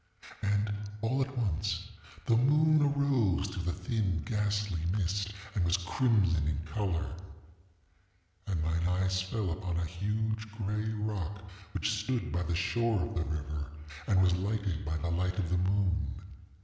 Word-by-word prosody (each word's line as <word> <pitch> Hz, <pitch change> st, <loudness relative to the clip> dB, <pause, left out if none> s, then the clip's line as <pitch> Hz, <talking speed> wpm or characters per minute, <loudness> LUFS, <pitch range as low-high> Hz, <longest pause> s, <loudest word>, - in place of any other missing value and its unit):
ŌĆ£And, 105 Hz, 0 st, 0 dB, 0.2 s
all 130 Hz, +4 st, +2 dB
at 130 Hz, 0 st, -2 dB
once, 95 Hz, -5 st, -1 dB, 0.3 s
the 115 Hz, -, +4 dB
moon 150 Hz, +5 st, +5 dB
arose 135 Hz, -10 st, +2 dB
through 95 Hz, -1 st, -4 dB
the 85 Hz, +1 st, 0 dB
thin 95 Hz, -3 st, -1 dB
ghastly 105 Hz, -6 st, 0 dB
mist, 100 Hz, +1 st, 0 dB, 0.2 s
and 95 Hz, -, +1 dB
was 85 Hz, +2 st, +3 dB
crimson 95 Hz, -, +2 dB
in 80 Hz, -, 0 dB
color. 85 Hz, 0 st, -1 dB, 1.3 s
And 90 Hz, -6 st, 0 dB
mine 85 Hz, +2 st, +1 dB
eyes 95 Hz, +1 st, +2 dB
fell 95 Hz, 0 st, -2 dB
upon 90 Hz, -1 st, -2 dB
a 85 Hz, -, 0 dB
huge 110 Hz, +5 st, -2 dB
gray 105 Hz, 0 st, -1 dB
rock 100 Hz, -3 st, -3 dB, 0.3 s
which -, -, +1 dB
stood 115 Hz, +4 st, -1 dB
by 90 Hz, -, 0 dB
the 85 Hz, -1 st, -1 dB
shore 115 Hz, +4 st, +1 dB
of 90 Hz, -, -2 dB
the 85 Hz, -2 st, -1 dB
river, 75 Hz, -1 st, -3 dB, 0.4 s
and 95 Hz, -3 st, +5 dB
was 90 Hz, -1 st, +5 dB
lighted 100 Hz, -1 st, -1 dB
by 80 Hz, +1 st, -1 dB
the 85 Hz, +1 st, -2 dB
light 90 Hz, +2 st, 0 dB
of 90 Hz, -4 st, -1 dB
the 90 Hz, -, +3 dB
moon. 95 Hz, -3 st, 0 dB
95 Hz, 155 wpm, -32 LUFS, 85-110 Hz, 1.3 s, moon